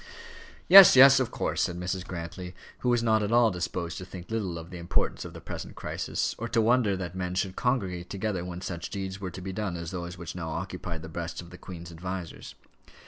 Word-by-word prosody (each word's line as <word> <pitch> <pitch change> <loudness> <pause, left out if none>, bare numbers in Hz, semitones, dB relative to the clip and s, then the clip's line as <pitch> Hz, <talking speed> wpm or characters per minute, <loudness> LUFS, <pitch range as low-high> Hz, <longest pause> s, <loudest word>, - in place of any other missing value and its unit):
"Yes, 195 -4 +11
yes, 135 +1 +9
of 130 - 0
course," - - -2
said 90 0 -1
Mrs. 90 0 -3
Grantly, 90 +1 -6 0.2
who 125 - 0
was 120 -1 +2
not 110 -1 +3
at 105 +1 -1
all 120 -1 +5
disposed 85 -1 -3
to - - -7
think 90 +1 -10
little 100 -7 -2
of 85 +2 -9
the 90 - -7
importance 85 - -1
of - - -8
the - - -9
present - - -7
crisis, - - -2
or 115 - -3
to 115 - +1
wonder 115 -3 +3
that 90 -2 -5
men 90 -1 -3
should 95 0 -1
congregate 95 -9 -1
together 100 -3 -2
when 90 0 -6
such 85 -3 -5
deeds 95 0 -5
were 95 - -3
to 90 +2 -9
be 95 +1 -5
done 95 -4 -3
as 85 -1 -6
those 90 -1 -5
which 85 -2 -7
now 85 -3 -5
occupied 80 +1 -5
the - - -6
breasts 85 +1 -5
of 85 -1 -9
the 90 - -10
Queen's 85 -2 -9
advisers. 90 +1 -6
90 Hz, 225 wpm, -28 LUFS, 85-105 Hz, 0.2 s, Yes